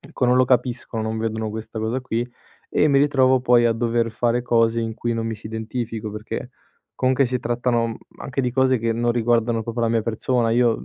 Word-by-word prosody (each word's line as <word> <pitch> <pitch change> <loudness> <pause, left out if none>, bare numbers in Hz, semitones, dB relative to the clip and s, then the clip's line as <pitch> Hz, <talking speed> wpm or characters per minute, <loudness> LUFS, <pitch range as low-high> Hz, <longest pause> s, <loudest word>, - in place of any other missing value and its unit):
ecco, 125 - -4
non 125 - +4
lo 130 - +5
capiscono, 125 -2 0
non 110 0 -2
vedono 110 -1 -2
questa 110 +1 -6
cosa 110 +4 -1
qui, 120 0 -2 0.4
e 150 - +3
mi 140 -1 +4
ritrovo 130 -3 +3
poi 120 -1 +4
a 115 - +3
dover 115 0 0
fare 120 +1 0
cose 115 -1 +2
in 115 -1 -2
cui 120 0 -2
non 115 0 -2
mi 110 - -2
ci 110 - -11
identifico 110 0 -4
perché, 110 +3 -6 0.4
comunque 130 +1 +2
si 125 +1 -1
trattano, 120 0 0
mhmm, 115 - -5 0.2
anche 135 0 -3
di 125 - 0
cose 130 +1 +3
che 115 0 0
non 120 +1 0
riguardano 115 -1 +1
proprio 115 +1 -4
la 115 - +2
mia 115 -1 +1
persona. 115 +1 0
Io 120 -1 +2
115 Hz, 215 wpm, -22 LUFS, 115-125 Hz, 0.4 s, lo